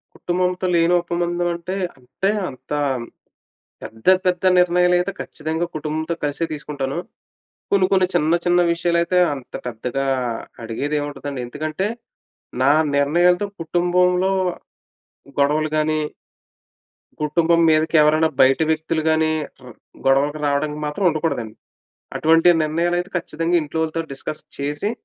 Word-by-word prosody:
కుటుంబంతో 180 +1 -1
లేని 170 +1 +3
ఉపబంధం 175 0 -1
అంటే, 170 +3 -5 0.2
అంటే 135 +10 -3 0.2
అంత 130 +1 -15 1.1
పెద్ద, 110 0 -11 0.2
పెద్ద 180 -1 +1 0.2
నిర్ణయాలైతే 180 +1 +3
ఖచ్చితంగా 160 +2 -3
కుటుంబంతో 155 +2 -2
కలిసే 145 +3 -1
తీసుకుంటాను. 145 -1 -4 0.8
కొన్ని 195 -2 +4
కొన్ని, 185 -1 +4
చిన్న 165 -1 +3
చిన్న 175 0 +4
విషయాలైతే 170 +1 +1 0.2
అంత 135 -3 -12
పెద్దగా 125 +3 -3 0.6
అడిగేదేమి 145 +6 -2
ఉంటదండి. 145 -2 -6
ఎందుకంటే 155 +8 -3 0.8
నా 135 +2 +5 0.2
నిర్ణయాలతో 175 +7 +3
కుటుంబంలో 180 +2 +2 1.1
గొడవలు 150 +2 +2
గాని 155 0 +1 1.2
కుటుంబం 165 +2 +2
మీదకి 155 +1 +2
ఎవరైనా 155 +1 +4
బయట 130 0 +5
వ్యక్తులు 160 0 0
గాని, 160 0 +3 0.3
ర - - -12 0.4
గొడవలకు 140 +3 +2
రావడానికి 150 +1 -1
మాత్రం 150 +7 -3
ఉండకూడదండి. 150 -9 -2 0.6
అటువంటి 165 +2 +4
నిర్ణయాలైతే 175 +4 0
ఖచ్చితంగా 170 0 -1
ఇంట్లో 155 +1 -4
వాళ్ళతో 160 +1 -1
డిస్కస్ 150 +2 -6 0.2
చేసి 145 +8 -2
160 Hz, 110 wpm, -21 LUFS, 145-175 Hz, 1.2 s, నా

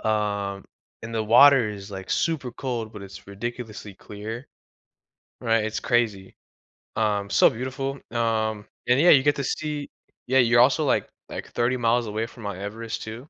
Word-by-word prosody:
Uh, 100 -2 -1 0.4
and 115 0 -7
the 110 - 0
water 125 0 +6
is, 100 -1 -9
like, 95 -1 -7
super 140 -7 0
cold, 120 -4 -4
but 105 -2 -9
it's 95 0 -11
ridiculously 110 0 -7
clear. 110 +6 -8 0.9
Right, 115 -1 +2
it's 110 0 -3
crazy. 110 -6 0 0.6
Um, 105 -2 0
so - - +5
beautiful, 130 +3 -4 0.2
um, 110 -2 -1 0.2
and 125 +2 +4
yeah, 175 - +6
you 135 -3 +6
get 145 +1 +3
to 140 - -2
see, 150 -1 -3 0.4
yeah, 130 +1 +4
you're 120 -1 +5
also, 135 +5 +5
like, - - +1 0.2
like, - - -6
30 125 +2 +1
miles 120 0 +1
away 110 +2 -2
from 115 0 -13
Mount 100 -2 -4
Everest 110 +3 -5
too, 115 +6 -8
115 Hz, 165 wpm, -25 LUFS, 105-125 Hz, 0.9 s, water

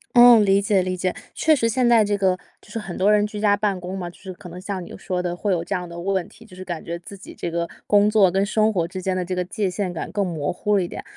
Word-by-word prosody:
嗯， 240 -3 +8
理 195 0 +4
解 200 -1 +2
理 185 0 -2
解。 185 0 -1 0.2
确 315 -1 +4
实 230 -4 +1
现 245 +1 +2
在 230 -2 +6
这 205 0 0
个 190 -2 +2 0.3
就 210 - -18
是 225 - -3
很 195 -4 -7
多 200 +3 +3
人 210 0 +3
居 210 0 -7
家 205 -1 +4
办 200 -3 -1
公 180 +2 -6
嘛， 180 -2 -4
就 175 - -17
是 190 -1 -9
可 175 0 -12
能 180 - -9
像 190 -1 -5
你 - - -11
说 180 -2 -3
的 175 -1 -3
会 205 +3 -1
有 170 -3 0
这 200 - -3
样 180 -1 -4
的 170 0 -8
问 190 0 -1
题， 225 - -17
就 195 -5 -15
是 185 - -9
感 175 -3 -5
觉 170 0 -4
自 175 +3 -11
己 195 - -12
这 170 - -4
个 170 0 -2 0.2
工 205 0 +4
作 205 -4 +4
跟 195 +1 +1
生 215 +1 +2
活 170 -3 0
之 185 +1 -7
间 190 0 0
的 185 - -1
这 185 +1 -3
个 180 - -1
界 200 +1 -2
限 185 -1 -3
感 165 - -5
更 205 -1 0
模 160 -4 -2
糊 205 +3 0
了 190 - +2
一 175 - -3
点。 - - -7
190 Hz, 340 characters per minute, -22 LUFS, 180-210 Hz, 0.3 s, 嗯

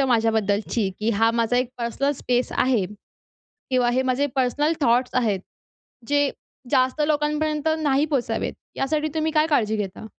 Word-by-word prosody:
माझ्याबद्दलची 220 -4 +1
की 220 +2 +1
हा 225 +2 +3
माझा 230 +1 +1
एक 250 -1 +1
पर्सनल 260 +5 -1
स्पेस 245 0 0
आहे 250 -7 +2 0.9
किंवा 250 -2 +2
हे 260 +2 +1
माझे 260 +2 +1
पर्सनल 290 +5 +1
थॉट्स 245 -1 +2
आहेत, 215 -7 +1 0.7
जे 285 -1 +2 0.4
जास्त 260 +1 +2
लोकांपर्यंत 300 0 0
नाही 285 0 +2
पोहचावेत, 275 -5 -1 0.2
यासाठी 300 +3 0
तुम्ही 315 0 0
काय 305 0 +3
काळजी 220 -7 +2
घेता? 200 0 -5
255 Hz, 140 wpm, -23 LUFS, 230-290 Hz, 0.9 s, हा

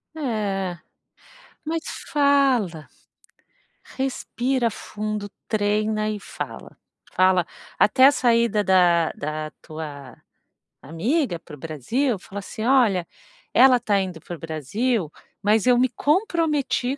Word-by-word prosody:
É. 205 - -2 0.9
Mas 320 +1 -2 0.3
fala, 270 - +2 1.1
respira 260 -2 -1
fundo, 210 -1 -5 0.2
treina 215 0 0
e 210 -1 -4
fala. - - -8 0.4
Fala 185 -2 +3 0.3
até 260 +5 +6
a 285 - +7
saída 235 -4 +2
da 175 -4 +4
da 155 +1 -5
tua 150 -4 -8 0.7
amiga 195 - -1
para 150 - -12
o - - -18
Brasil. 205 - -1
Fala 200 +2 -8
assim: 210 +2 -7
"Olha, 230 -9 +3 0.5
ela 255 -2 +6
tá 210 -4 +1
indo 180 -5 -4
para 175 - -7
o - - -14
Brasil, 165 - -2 0.3
mas 215 +3 +2
eu 245 - +5
me 255 +1 +3
comprometi 300 - 0
215 Hz, 115 wpm, -23 LUFS, 175-255 Hz, 1.1 s, a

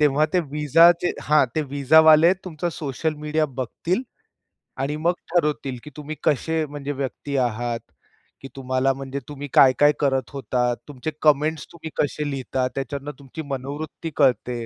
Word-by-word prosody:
तेव्हा 150 0 +4
ते 180 - +3
व्हिसाचे 165 +4 +4
हां, 150 -2 +4
ते 155 - +1
व्हिसावाले 155 +4 +5
तुमचं 175 -1 -3
सोशल 155 +2 -3
मीडिया 150 +1 0
बघतील 135 - -3 0.8
आणि 140 +2 -1
मग 175 - +3 0.2
ठरवतील, 150 -6 0
की 150 - -9
तुम्ही 150 +1 -6
कसे 160 +3 +1
म्हणजे 145 -1 -6
व्यक्ती 140 0 -4
आहात, 120 -1 -1 0.6
की 135 - -8
तुम्हाला 130 0 0
म्हणजे 135 +1 -5
तुम्ही 145 0 -6
काय 130 -1 +7
काय 145 0 +6
करत 135 -3 0
होतात, 125 -3 -1
तुमचे 145 +1 -5
कमेंट्स 155 +1 +2
तुम्ही 160 -1 -8
कसे 150 0 -2
लिहिता 130 -1 -2
त्यातून 140 +2 -4
तुमची 140 +3 -8
मनोवृत्ती 145 +5 -5
कळते. 125 -4 +1
145 Hz, 145 wpm, -23 LUFS, 135-155 Hz, 0.8 s, काय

